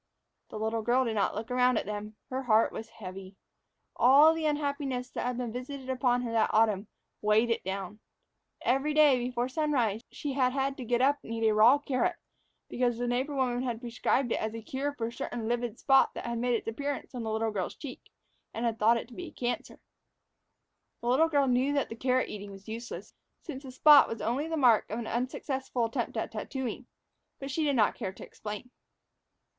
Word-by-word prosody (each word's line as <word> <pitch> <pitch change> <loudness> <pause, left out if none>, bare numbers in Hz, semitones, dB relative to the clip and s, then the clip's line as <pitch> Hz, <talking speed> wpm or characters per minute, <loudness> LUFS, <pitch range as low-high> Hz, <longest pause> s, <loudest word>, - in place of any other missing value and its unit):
The - - -7
little 220 +1 -1
girl 245 +4 +2
did 230 - -1
not 205 -2 0
look 225 +4 -5
around 250 -1 +3
at - - -1
them. 210 +1 -5 0.2
Her 260 +1 -1
heart 225 -3 +3
was 225 - -7
heavy. 190 -1 -9 0.6
All 285 +6 +7
the 325 -1 -1
unhappiness 280 -4 -2
that - - -3
had 250 -1 -2
been 245 -2 -3
visited 260 +2 -5
upon 245 -1 +1
her 235 - -3
that 225 -1 +2
autumn 215 -2 +2 0.3
weighed 215 +3 +3
it 230 - -1
down. 195 +2 -5 0.6
Every 275 +4 +1
day, 295 -4 +6
before 245 0 -1
sunrise, 255 -7 0
she 290 -2 -4
had 255 -2 +2
had 270 0 0
to 255 - -6
get 240 +1 +1
up 285 +2 +3
and - - -10
eat 225 -1 +1
a 215 - +3
raw 225 +6 +7
carrot, 290 +5 0 0.5
because 240 -2 0
the 245 - -2
neighbor 255 +4 -1
woman 250 -2 0
had 240 -3 -2
prescribed 240 +1 0
it - - +1
as 220 +1 -3
a 225 - -7
cure 275 +5 -2
for 230 - -2
a 230 - -4
certain 240 -4 -4
livid 240 -1 -1
spot 270 -1 +4
that - - -6
had 235 -1 -2
made 245 0 +1
its 225 - -4
appearance 280 +6 -4
on 245 - -4
the 220 -1 -3
little 220 0 0
girl's 190 -4 -3
cheek, 270 -4 -9 0.5
and 230 - -2
was 230 -1 0
thought 225 +2 +4
to 245 - -14
be 355 +5 -7
a - - -10
cancer. 245 -4 -4 1.2
The 240 - -2
little 310 +6 +4
girl 285 -3 +3
knew 260 +2 +2
that 280 -2 0
the 225 - -6
carrot 255 +2 +1
eating 205 -1 -7
was 195 +1 -12
useless, 230 +2 -7 0.3
since 270 -5 -7
the 265 -2 -9
spot 290 +2 +7
was 225 - -5
only 260 +7 -1
the 325 0 -2
mark 245 -6 +4
of 220 - -3
an 235 - -4
unsuccessful 255 +1 -2
attempt 230 - -3
at - - -2
tattooing; 260 -1 -5 0.5
but 275 0 -6
she 315 +4 0
did 285 -2 +2
not 215 -4 +3
care 190 - -4
to - - -10
explain. 210 +3 -8
245 Hz, 210 wpm, -29 LUFS, 225-270 Hz, 1.2 s, All